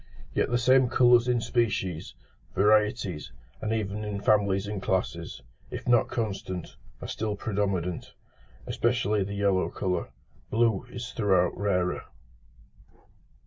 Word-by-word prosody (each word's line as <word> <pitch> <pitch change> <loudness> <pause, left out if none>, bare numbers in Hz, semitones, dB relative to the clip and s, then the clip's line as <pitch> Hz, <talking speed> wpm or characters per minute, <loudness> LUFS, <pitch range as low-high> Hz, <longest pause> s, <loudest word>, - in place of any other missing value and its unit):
Yet - - +1
the 120 - +2
same 130 +1 +4
colours 120 -1 +5
in 120 -1 +2
species, 105 -8 -1 0.4
varieties, 105 - +2 0.3
and 110 - -2
even 105 -1 -2
in 105 -1 -3
families 100 -1 +2
and 100 -1 -4
classes, 85 -7 -2 0.3
if - - -7
not 120 -1 +4
constant, 95 -6 -4 0.3
are - - -5
still 105 -1 -2
predominant, 100 -5 -2 0.5
especially 110 -4 +1
the 100 +1 -5
yellow 100 -2 +2
colour: 90 -2 -2 0.4
blue 115 0 +1
is 120 0 -6
throughout 95 -5 +2
rarer. 90 -2 0
105 Hz, 120 wpm, -27 LUFS, 95-115 Hz, 0.5 s, colours